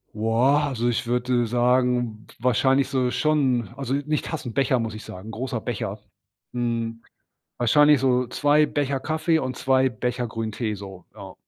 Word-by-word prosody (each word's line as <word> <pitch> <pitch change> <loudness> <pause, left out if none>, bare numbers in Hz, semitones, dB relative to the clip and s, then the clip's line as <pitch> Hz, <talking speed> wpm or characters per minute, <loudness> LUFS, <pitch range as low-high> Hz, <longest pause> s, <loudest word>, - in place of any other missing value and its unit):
Wow. 120 +7 +2
Also 120 -3 -1
ich 115 - -2
würde, 125 0 +1
sagen 120 -2 +1
wahrscheinlich 130 +2 +2
so 130 -2 0
schon 130 -8 +1
also 135 -2 -3
nicht 145 +2 -1
Tassen, 145 -7 -5
Becher 135 0 +2
muss 115 -1 -3
ich 110 - -9
sagen, 95 +5 -9
großer 120 0 -4
Becher. 105 -3 -4 0.5
Hm, 115 -1 -2 0.6
wahrscheinlich 145 +4 +5
so 125 -2 +2
2 150 +3 +3
Becher 140 -2 -1
Kaffee 160 +2 0
und 130 -3 -4
2 130 0 +2
Becher 125 0 -3
Grünen 110 -1 -4
Tee 110 0 -2
so. 95 -3 -10
Ja. - - -11
125 Hz, 155 wpm, -24 LUFS, 115-135 Hz, 0.6 s, wahrscheinlich